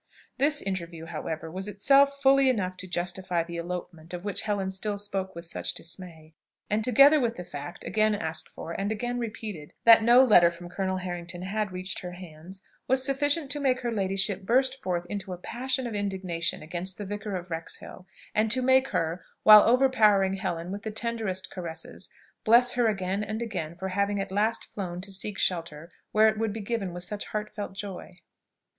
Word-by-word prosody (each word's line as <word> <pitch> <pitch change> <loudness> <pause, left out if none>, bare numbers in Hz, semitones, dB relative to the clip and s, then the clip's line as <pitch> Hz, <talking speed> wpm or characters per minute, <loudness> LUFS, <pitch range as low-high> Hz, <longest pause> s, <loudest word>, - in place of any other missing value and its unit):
This 290 +2 +3
interview, 170 -4 -4
however, 160 0 -5
was 190 +3 -3
itself 275 +7 +4
fully 270 0 +6
enough 185 -7 -1
to 185 - -7
justify 180 -1 -1
the 170 0 -7
"elopement," 170 -1 -6
of 175 +2 -8
which 205 - -1
Helen 205 -3 -1
still 205 +2 -2
spoke 195 -2 -3
with 170 +1 -6
such 170 - -3
dismay; 165 -2 -7 0.4
and, 215 +1 +1
together 275 +6 +6
with 235 -3 0
the 180 - -6
fact, 150 0 -8
again 215 0 +2
asked 160 -4 -2
for, 165 - -8
and 195 +5 -2
again 240 +3 -2
repeated, 215 -9 -6
that 230 -1 +8
no 240 +3 +7
letter 190 -9 +6
from 175 +1 -10
Colonel 190 0 -2
Harrington 175 -1 -5
had 210 +1 -2
reached 185 +1 -4
her 180 -1 -7
hands, 180 +1 -11 0.2
was 260 0 +3
sufficient 290 +1 +1
to 295 - 0
make 260 -2 +1
her 240 -1 -2
ladyship 195 -1 0
burst 260 +6 +1
forth 175 -2 -2
into 195 -1 -5
a - - -6
passion 260 +7 -3
of 235 - -4
indignation 190 -6 -2
against 175 +4 -4
the 205 - -5
Vicar 205 0 -4
of 175 -1 -6
Wrexhill, 165 +3 -7 0.3
and 215 +1 +2
to 255 +3 +1
make 260 +1 +4
her, 165 -6 -2 0.2
while 215 -1 +10
overpowering 220 -6 +4
Helen 175 -2 -3
with 200 +1 -5
the 220 - -4
tenderest 215 -4 -3
caresses, 170 -3 -7 0.3
bless 240 +2 +5
her 245 -1 +2
again 195 -1 -1
and 215 +1 -4
again 185 -9 -4
for 190 +2 -4
having 200 +1 0
at 195 0 -4
last 215 +3 +1
flown 180 -3 -6
to 195 +1 -7
seek 200 +2 -3
shelter 165 -2 -2 0.2
where 215 +1 +5
it 220 0 +1
would 220 -2 -1
be 220 - -5
given 200 -3 -2
with 175 0 -5
such 205 +3 -3
heartfelt 210 -1 -5
joy. 195 -2 -8
195 Hz, 190 wpm, -27 LUFS, 180-225 Hz, 0.4 s, while